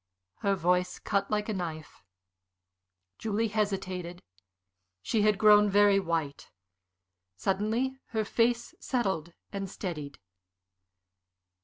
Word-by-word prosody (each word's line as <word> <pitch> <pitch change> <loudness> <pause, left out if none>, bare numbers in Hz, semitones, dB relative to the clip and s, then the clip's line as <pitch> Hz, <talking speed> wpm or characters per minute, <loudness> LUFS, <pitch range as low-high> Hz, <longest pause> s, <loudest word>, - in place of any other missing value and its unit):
Her 200 0 +1
voice 180 0 +1
cut 200 0 -1
like 210 -1 0
a 220 - -1
knife. 160 -5 -6 1.2
Julie 220 +1 0
hesitated. 190 -4 -2 0.8
She 215 - +1
had 210 -1 +3
grown 210 0 +6
very 200 0 +5
white. 165 -6 -3 0.9
Suddenly 220 - 0
her 220 -2 -1
face 235 +2 +1
settled 190 - -1 0.2
and 195 -2 -4
steadied. 155 -8 -6
200 Hz, 100 wpm, -29 LUFS, 180-215 Hz, 1.2 s, grown